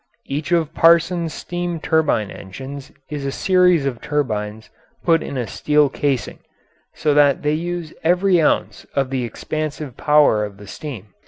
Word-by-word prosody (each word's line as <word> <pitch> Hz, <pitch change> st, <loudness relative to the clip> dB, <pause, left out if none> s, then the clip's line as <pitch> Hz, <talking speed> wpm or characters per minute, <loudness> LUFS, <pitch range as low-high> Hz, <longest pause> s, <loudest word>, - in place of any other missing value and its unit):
Each 150 Hz, +5 st, -4 dB
of 165 Hz, -3 st, +1 dB
Parsons's 170 Hz, 0 st, +4 dB
steam 175 Hz, +1 st, -4 dB
turbine 150 Hz, -11 st, +1 dB
engines 135 Hz, +8 st, -9 dB, 0.2 s
is 145 Hz, -2 st, -4 dB
a 135 Hz, -, -2 dB
series 180 Hz, -2 st, +3 dB
of 125 Hz, -4 st, -3 dB
turbines 110 Hz, -7 st, -3 dB, 0.3 s
put 165 Hz, -1 st, +3 dB
in 140 Hz, -, -5 dB
a 125 Hz, -, -1 dB
steel 150 Hz, +7 st, +2 dB
casing, 135 Hz, -5 st, -2 dB, 0.6 s
so 150 Hz, -2 st, +1 dB
that 145 Hz, -1 st, +4 dB
they 150 Hz, 0 st, +1 dB
use 170 Hz, 0 st, -3 dB
every 180 Hz, +1 st, +3 dB
ounce 150 Hz, -, 0 dB
of 135 Hz, -1 st, 0 dB
the 130 Hz, -2 st, -1 dB
expansive 150 Hz, +3 st, -5 dB
power 150 Hz, -8 st, +4 dB
of 100 Hz, -1 st, -6 dB
the 105 Hz, -, -12 dB
steam. 105 Hz, -3 st, -8 dB
150 Hz, 155 wpm, -20 LUFS, 130-165 Hz, 0.6 s, Parsons's